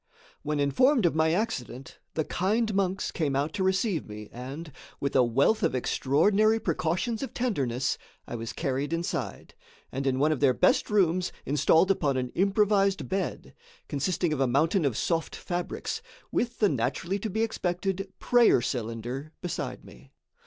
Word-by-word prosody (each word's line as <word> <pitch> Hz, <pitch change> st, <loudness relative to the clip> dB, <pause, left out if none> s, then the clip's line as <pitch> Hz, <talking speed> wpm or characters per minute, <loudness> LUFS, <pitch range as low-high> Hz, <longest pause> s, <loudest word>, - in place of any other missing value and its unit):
When 150 Hz, -1 st, -2 dB
informed 220 Hz, -, +3 dB
of 170 Hz, -, +3 dB
my 160 Hz, 0 st, +2 dB
accident, 135 Hz, -, -3 dB, 0.2 s
the 155 Hz, -, 0 dB
kind 215 Hz, +4 st, 0 dB
monks 195 Hz, -1 st, 0 dB
came 145 Hz, -5 st, -1 dB
out 145 Hz, +3 st, 0 dB
to 190 Hz, -, -1 dB
receive 190 Hz, -2 st, 0 dB
me 105 Hz, 0 st, -8 dB
and, 140 Hz, +6 st, -7 dB, 0.3 s
with 140 Hz, -, -2 dB
a 130 Hz, -, +6 dB
wealth 135 Hz, -, +2 dB
of -, -, +1 dB
extraordinary 200 Hz, -, +2 dB
precautions 180 Hz, +6 st, -1 dB
of 270 Hz, -, -5 dB
tenderness, 135 Hz, -, -1 dB, 0.3 s
I -, -, -7 dB
was 115 Hz, -1 st, -4 dB
carried 140 Hz, 0 st, -2 dB
inside, 170 Hz, +1 st, -3 dB, 0.4 s
and, 135 Hz, +1 st, -2 dB
in 130 Hz, -1 st, +1 dB
one 150 Hz, +3 st, +3 dB
of 155 Hz, -, 0 dB
their 135 Hz, -3 st, +4 dB
best -, -, +3 dB
rooms, 185 Hz, -3 st, +2 dB
installed 160 Hz, +6 st, +4 dB
upon 145 Hz, -8 st, +1 dB
an 125 Hz, -1 st, -1 dB
improvised 200 Hz, -, +2 dB
bed, 190 Hz, 0 st, -3 dB, 0.3 s
consisting 155 Hz, +3 st, 0 dB
of 145 Hz, -, -2 dB
a 135 Hz, -, +3 dB
mountain 155 Hz, +7 st, +2 dB
of 130 Hz, -6 st, 0 dB
soft 165 Hz, -2 st, -1 dB
fabrics, 175 Hz, -1 st, -4 dB, 0.3 s
with 240 Hz, 0 st, -1 dB
the 210 Hz, -, +4 dB
naturally 145 Hz, -, -1 dB
to 220 Hz, -, -3 dB
be 220 Hz, +3 st, 0 dB
expected 195 Hz, -2 st, -2 dB
prayer 245 Hz, -, +5 dB
cylinder 120 Hz, +5 st, -4 dB
beside 180 Hz, -, -4 dB
me. 65 Hz, +2 st, -15 dB
160 Hz, 160 wpm, -28 LUFS, 135-195 Hz, 0.4 s, a